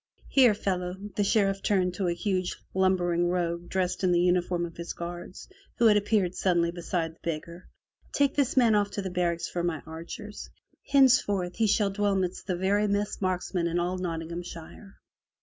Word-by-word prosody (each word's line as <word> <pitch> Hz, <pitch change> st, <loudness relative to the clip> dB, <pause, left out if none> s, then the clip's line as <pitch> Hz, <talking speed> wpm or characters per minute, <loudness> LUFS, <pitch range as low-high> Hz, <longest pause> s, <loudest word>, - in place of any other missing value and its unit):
"Here, 250 Hz, -6 st, +5 dB
fellow," 180 Hz, -3 st, -2 dB, 0.2 s
the 205 Hz, -, +1 dB
Sheriff 195 Hz, -1 st, +2 dB
turned 185 Hz, -3 st, +1 dB
to 185 Hz, 0 st, -2 dB
a 175 Hz, -, +1 dB
huge 185 Hz, -1 st, -1 dB, 0.2 s
lumbering 175 Hz, -2 st, +2 dB
rogue 175 Hz, -1 st, -2 dB
dressed 185 Hz, 0 st, -1 dB
in 185 Hz, -, +3 dB
the 175 Hz, -, +3 dB
uniform 175 Hz, 0 st, +1 dB
of 165 Hz, -, -9 dB
his 170 Hz, 0 st, -5 dB
guards, 175 Hz, +1 st, -7 dB, 0.3 s
who 235 Hz, -, +3 dB
had 215 Hz, -2 st, +7 dB
appeared 205 Hz, -3 st, +1 dB
suddenly 175 Hz, -3 st, +1 dB
beside 170 Hz, -1 st, -3 dB
the -, -, -28 dB
beggar. 170 Hz, +2 st, -5 dB, 0.4 s
"Take 280 Hz, -1 st, +2 dB
this 275 Hz, -2 st, 0 dB
man 235 Hz, -4 st, +5 dB
off 205 Hz, -1 st, +2 dB
to 200 Hz, -, -3 dB
the 190 Hz, -, -4 dB
barracks 175 Hz, -2 st, -1 dB
for 175 Hz, -, -3 dB
my 170 Hz, -3 st, -2 dB
archers. 170 Hz, +6 st, -8 dB, 0.4 s
Henceforth 240 Hz, -10 st, +3 dB
he 220 Hz, -1 st, +3 dB
shall 205 Hz, -1 st, +2 dB
dwell 205 Hz, 0 st, +1 dB
midst 185 Hz, 0 st, -2 dB
the 185 Hz, -, 0 dB
very 200 Hz, +3 st, +2 dB
best 205 Hz, 0 st, -1 dB
marks 185 Hz, -1 st, -1 dB
men 170 Hz, -2 st, +1 dB
in 170 Hz, +1 st, -1 dB
all 180 Hz, +1 st, -1 dB
Nottinghamshire.' 170 Hz, +2 st, -6 dB
180 Hz, 185 wpm, -28 LUFS, 175-205 Hz, 0.4 s, had